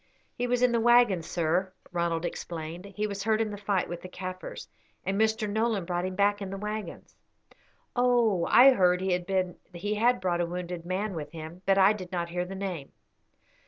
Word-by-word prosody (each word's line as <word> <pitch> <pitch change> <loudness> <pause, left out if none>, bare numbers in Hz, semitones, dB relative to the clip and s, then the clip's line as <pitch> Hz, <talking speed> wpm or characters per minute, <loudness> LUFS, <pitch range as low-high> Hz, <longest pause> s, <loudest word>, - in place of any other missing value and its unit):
"He 245 - -2
was 245 0 +1
in 250 - +5
the 235 - +2
waggon, 240 -5 +5
sir," 175 +3 -1 0.2
Ronald 170 -1 -1
explained; 170 +1 -5
"he 205 +1 -3
was 200 -2 -4
hurt 220 +1 +1
in 220 -1 0
the - - -5
fight 200 -2 0
with 175 0 -6
the 185 - -9
Kaffirs, 185 0 -7 0.4
and 195 +2 0
Mr. 220 -1 +1
Nolan 215 -2 0
brought 175 0 -1
him 185 0 -4
back 205 +1 +2
in 195 - -4
the 195 - -5
waggons." 210 +1 -6 0.8
"Oh, 240 -7 +3
I 265 +3 +8
heard 180 -6 +3
he 190 0 -1
had 190 +5 0
brought 175 -2 0
a - - +1
wounded 175 -1 -5
man 195 +3 -2
with 150 -3 -6
him; 160 +2 -8
but 195 0 +4
I 195 +2 +6
did 185 -3 -8
not 170 -2 -2
hear 180 +1 -2
the 190 +2 -7
name. 185 -7 -5
190 Hz, 195 wpm, -28 LUFS, 175-215 Hz, 0.8 s, I